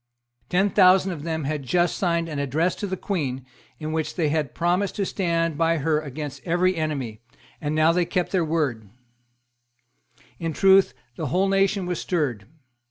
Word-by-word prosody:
Ten 195 +3 +2
thousand 190 -1 +5
of 160 -5 -6
them 160 0 -3
had 150 +1 -2
just 175 +6 +1
signed 170 -2 0
an 150 -3 -4
address 155 +6 0
to 205 - -3
the 190 0 -3
Queen, 135 -10 -3 0.3
in 155 0 -5
which 160 -1 -2
they 160 -4 +1
had 150 -3 -1
promised 180 +3 0
to 200 - -1
stand 165 -5 -1
by 165 0 +3
her 155 +1 +1
against 145 -1 -6
every 180 +2 +1
enemy; 140 -9 -3 0.4
and 150 0 -2
they - - +3
now 165 +2 +4
kept 180 +1 -1
their 185 -3 +2
word, 145 -10 -1 1.5
In 165 -1 -3
truth, 195 +3 +4 0.2
the 160 - -3
whole 185 +9 +1
nation 195 0 +2
was 180 -1 -2
stirred. 135 - -2
165 Hz, 170 wpm, -24 LUFS, 150-180 Hz, 1.5 s, thousand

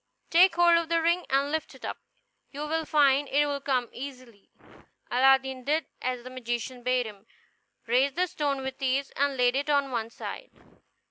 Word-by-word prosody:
Take 350 +1 +6
hold 345 -1 +5
of 330 -1 -5
the 335 0 +2
ring 340 +2 +1
and 275 +2 +1
lift 315 0 -3
it - - -10
up; - - -5 0.5
you 285 - -8
will 320 +1 -1
find 285 -2 +3
it 290 +1 +3
will 285 -1 -3
come 255 -3 0
easily." 255 -5 -10 0.6
Aladdin 265 0 +3
did 305 +4 0 0.2
as 250 -1 -3
the 255 - -9
magician 245 0 -4
bade 250 0 +1
him, 210 0 -11 0.6
raised 260 +4 +2
the 365 - +2
stone 290 -5 -2
with 265 +1 -6
ease, 270 +1 0
and 280 -1 0
laid 245 0 +3
it 285 +2 -1
on 280 -2 +2
one 230 -2 -2
side. - - -8
270 Hz, 185 wpm, -27 LUFS, 255-295 Hz, 0.6 s, Take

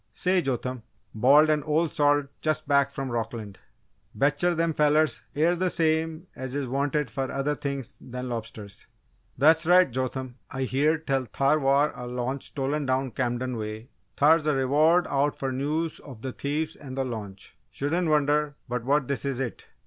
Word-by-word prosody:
"Say, 185 0 +2
Jotham!" 125 -3 -3 0.3
bawled 145 +7 +5
an 150 -1 +2
old 155 +3 0
salt 145 -1 +3 0.2
just 155 0 -1
back 140 -1 +3
from 135 -2 -5
Rockland, 115 -4 -4 0.6
"Bet'cher 160 +7 +2
them 165 0 +1
fellers 150 +1 +2
air 165 +4 +3
the 185 +1 0
same 160 0 0
es 130 0 -6
is 140 -2 -2
wanted 140 0 -1
fer 135 +2 -2
other 140 +2 -1
things 140 -3 -5
than 125 0 -6
lobsters!" 110 -4 -7 0.5
"That's 160 +3 +4
right, 180 -4 +6
Jotham! 130 0 -3
I 135 0 -3
heared 150 +5 +1
tell 135 -2 0
thar 140 +5 +1
war 140 +2 +3
a 125 - -7
launch 125 +2 -3
stolen 140 +1 -2
down 130 0 0
Camden 125 0 -2
way 110 +3 -6 0.3
thar's 155 +1 +4
a 150 - +2
reward 155 +6 +3
out 140 +1 0
fer 135 -1 -2
news 150 +5 -2
of 125 -6 -12
the 130 - -3
thieves 150 +5 -3
and 135 -2 -9
the 135 - 0
launch 100 -5 -7 0.2
shoulden' 165 +5 -1
wonder 150 -1 +2
but 125 -1 -3
what 135 +1 +1
this 140 - -2
is 135 -2 -2
it!" 130 -4 -5
140 Hz, 170 wpm, -26 LUFS, 130-155 Hz, 0.6 s, right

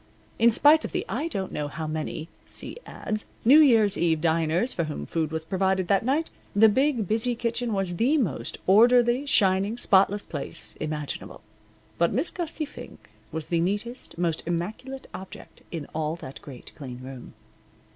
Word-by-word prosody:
In 230 +1 +6
spite 295 +7 +5
of - - -6
the - - -1
I 315 - -2
don't 195 - -4
know 150 - -3
how 155 +2 -5
many 155 +1 -4 0.2
(see - - -4
ads) 215 0 -4 0.2
New 275 +6 +8
Year's 225 -9 +5
Eve 165 -2 +2
diners 165 +7 +1
for 170 - -1
whom 150 - -5
food 160 -2 -1
was 160 0 -4
provided 190 +1 0
that 200 +1 +3
night, 285 +7 0 0.2
the 220 +2 +7
big, 255 -2 +1
busy 225 +4 +1
kitchen 235 0 -2
was 190 -4 -1
the 265 - +3
most 145 - -2
orderly, 240 +6 +5
shining, 195 -1 +3
spotless 200 -2 +3
place - - -5
imaginable. 150 -1 -5 0.6
But 170 +1 +3
Miss 270 - 0
Gussie 330 -3 -4
Fink 295 - -12 0.2
was 160 -1 -5
the 170 - +1
neatest, 205 +7 -3
most 170 -2 0
immaculate 220 +11 -4
object 190 0 -10
in 160 -4 -5
all 155 0 -1
that 135 -5 -10
great, 130 -4 -11
clean 125 -4 -8
room. 130 -1 -10
195 Hz, 165 wpm, -26 LUFS, 160-240 Hz, 0.6 s, New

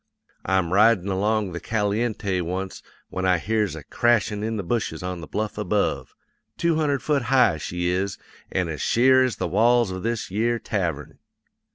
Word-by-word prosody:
I'm 95 -2 0
ridin' 105 -2 +4
along 105 +1 0
the 85 - -5
Caliente 105 -3 -1
once 90 +2 -4 0.3
when 95 - -4
I 90 -1 +3
hears 105 +2 -1
a - - -8
crashin' 115 -3 +1
in 110 0 -2
the 100 - -3
bushes 110 0 -2
on 90 -1 -4
the 80 - -8
bluff 105 0 -3
above 105 -1 -1 0.4
two 170 0 +2
hundred 145 -3 0
foot 145 -2 +1
high, 125 -9 +3
she 90 +3 -3
is, 95 +2 -1 0.3
an' 95 -2 0
as 75 -4 -5
sheer 130 +2 +4
as 125 -4 0
the - - -2
walls 115 +3 +3
of 95 0 -5
this 115 -2 -3
yere 115 +4 +1
tavern. 85 - -3
105 Hz, 175 wpm, -24 LUFS, 90-115 Hz, 0.4 s, ridin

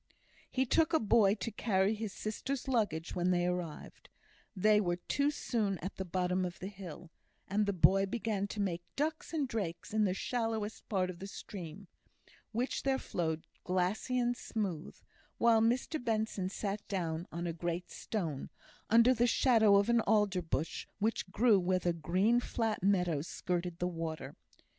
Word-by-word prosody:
He 260 0 +1
took 320 +6 +2
a 320 - +5
boy 210 -2 +4
to 230 +2 -4
carry 200 -2 +1
his 215 -1 -4
sister's 250 +7 -4
luggage 205 -11 0
when 180 0 +2
she 175 -1 +2
arrived; 180 -3 -4 0.5
they 210 +2 +4
were 175 -3 0
too 280 +10 0
soon 220 -9 -1
at 185 +4 -6
the 190 - -3
bottom 180 +1 0
of 175 -1 -4
the 190 - -6
hill, 180 -4 -9 0.4
and 205 +1 +1
the - - +3
boy 195 +1 +4
began 210 -2 -1
to 210 - -6
make 180 -4 -1
ducks 310 +2 -2
and 305 -4 0
drakes 210 -3 -4
in 215 -1 +3
the 185 -1 0
shallowest 225 -1 -2
part 185 -3 +1
of 175 - -12
the 195 - -6
stream, 195 -2 -8 0.6
which 240 +4 -1
there 270 -1 +1
flowed 160 -8 -2 0.2
glassy 185 +7 0
and 245 0 +1
smooth, 190 -10 -4 0.4
while 230 -1 +5
Mr 245 +5 +1
Benson 215 -5 -1
sat 200 +1 -3
down 170 -3 -2
on 170 +1 -4
a 170 - -2
great 170 +2 -3
stone, 165 -11 -3 0.4
under 230 +3 +6
the 240 0 +2
shadow 225 -4 +5
of 200 +1 +4
an 235 -1 +4
alder 205 -3 +3
bush 160 -1 -3
which 210 -2 -1
grew 210 +1 +4
where 185 +1 +2
the 175 -1 0
green, 185 +8 +2
flat 225 -3 -1
meadow 180 -6 +2
skirted 175 +1 -3
the 180 - 0
water. 165 -2 -5
200 Hz, 170 wpm, -33 LUFS, 180-225 Hz, 0.6 s, under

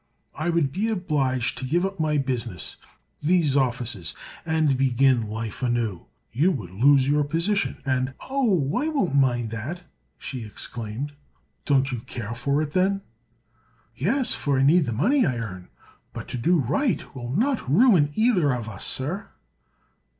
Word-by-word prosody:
"I 155 +3 -2
would 165 -5 +1
be 200 +9 -1
obliged 140 - 0
to - - -6
give 170 +7 +1
up 195 -2 -4
my 155 -1 +1
business—these 135 - -2
offices—and 130 - -1
begin 130 -1 +3
life 110 +2 -5
anew. 120 -7 -1 0.2
You 145 - +3
would 100 - -6
lose 135 +7 +4
your 145 +1 +3
position, 170 +8 -1
and—" 130 0 0
"Oh, 245 - +1 0.2
I 305 - 0
won't 275 - 0
mind 120 -5 +2
that!" 135 - -5 0.3
she 130 -4 -6
exclaimed. 115 +5 -5 0.5
"Don't 135 -1 +2
you 125 - -3
care 115 -1 -6
for 140 +5 0
it, 150 - -5
then?" 195 +3 +1 0.9
"Yes; 235 - +1
for 140 -2 0
I 130 - +3
need 155 +4 +5
the 120 - -2
money 240 - +2
I 130 - 0
earn. 95 -6 -6 0.5
But - - -7
to - - -3
do 175 +9 +3
right 150 - -1
will 120 -3 -6
not 235 - 0
ruin 180 - +5
either 185 - +3
of 115 -3 -5
us, 100 -3 -4
sir." 170 +10 -3
140 Hz, 150 wpm, -25 LUFS, 120-175 Hz, 0.9 s, need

